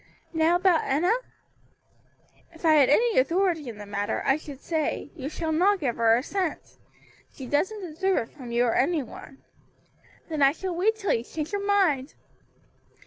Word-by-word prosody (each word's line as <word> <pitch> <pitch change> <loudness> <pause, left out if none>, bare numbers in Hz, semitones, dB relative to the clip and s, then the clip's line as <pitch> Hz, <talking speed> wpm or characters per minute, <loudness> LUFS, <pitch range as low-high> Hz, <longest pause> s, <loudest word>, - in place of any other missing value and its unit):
Now 320 +1 +3
about 355 -2 +3
Enna?" 330 +10 +2 1.4
"If 325 - -9
I 315 - +6
had 290 -4 +5
any 455 - +4
authority 330 0 +1
in 225 - -9
the 205 - -9
matter, 205 0 -3
I 270 - +4
should 290 -3 -9
say, 310 -1 -2
you 280 -3 -5
shall 320 0 -3
not 380 +5 +3
give 260 -7 -2
her 230 -1 +4
a 250 - -2
cent. 370 0 -4 0.5
She 265 - -9
doesn't 380 - -1
deserve 370 +2 -1
it - - -27
from 255 -5 -9
you 240 +1 +2
or 230 - +1
any 310 +2 +1
one." 270 +3 -13 0.8
"Then 310 -3 -3
I 275 0 +5
shall 365 +2 -4
wait 420 +6 +2
till 410 -3 -1
you 230 - -1
change 305 +4 -5
your 405 -1 -2
mind." 365 -10 +1
315 Hz, 180 wpm, -26 LUFS, 270-370 Hz, 1.4 s, I